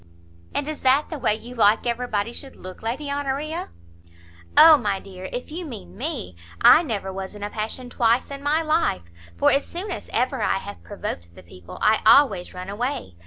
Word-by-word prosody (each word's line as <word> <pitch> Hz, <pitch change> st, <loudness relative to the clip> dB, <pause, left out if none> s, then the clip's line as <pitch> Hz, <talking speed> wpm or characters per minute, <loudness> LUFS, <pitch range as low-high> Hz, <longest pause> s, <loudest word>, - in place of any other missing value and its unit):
"And 285 Hz, -, -1 dB
is 310 Hz, -1 st, -5 dB
that 270 Hz, +5 st, +3 dB
the 310 Hz, -, -4 dB
way 215 Hz, -4 st, +2 dB
you 240 Hz, +3 st, -10 dB
like 220 Hz, -1 st, +3 dB
every 240 Hz, +1 st, -1 dB
body 215 Hz, +1 st, -2 dB
should 270 Hz, +1 st, -8 dB
look, 185 Hz, 0 st, -10 dB
Lady 270 Hz, +6 st, -3 dB
Honoria?" 285 Hz, +3 st, -3 dB, 0.9 s
"O 320 Hz, -1 st, +10 dB
my 205 Hz, -8 st, -1 dB
dear, 190 Hz, -1 st, -9 dB
if 250 Hz, +4 st, -6 dB
you 345 Hz, +3 st, -5 dB
mean 90 Hz, -, -9 dB
me, 90 Hz, -2 st, -4 dB, 0.2 s
I -, -, +8 dB
never 205 Hz, -, -4 dB
was 190 Hz, +1 st, -6 dB
in 205 Hz, -, -8 dB
a 205 Hz, -, -4 dB
passion 225 Hz, +4 st, -4 dB
twice 240 Hz, +2 st, +1 dB
in 280 Hz, 0 st, -6 dB
my 300 Hz, +3 st, +1 dB
life; 305 Hz, -, 0 dB, 0.3 s
for -, -, +4 dB
as 280 Hz, -, +3 dB
soon 375 Hz, +4 st, -6 dB
as -, -, -6 dB
ever 255 Hz, +1 st, 0 dB
I -, -, +1 dB
have 200 Hz, +1 st, -8 dB
provoked 85 Hz, -, -7 dB
the -, -, -13 dB
people, 90 Hz, +1 st, -12 dB
I 220 Hz, -, +4 dB
always 215 Hz, -6 st, +5 dB
run 180 Hz, 0 st, -8 dB
away. 240 Hz, -, -3 dB
235 Hz, 200 wpm, -23 LUFS, 195-280 Hz, 0.9 s, O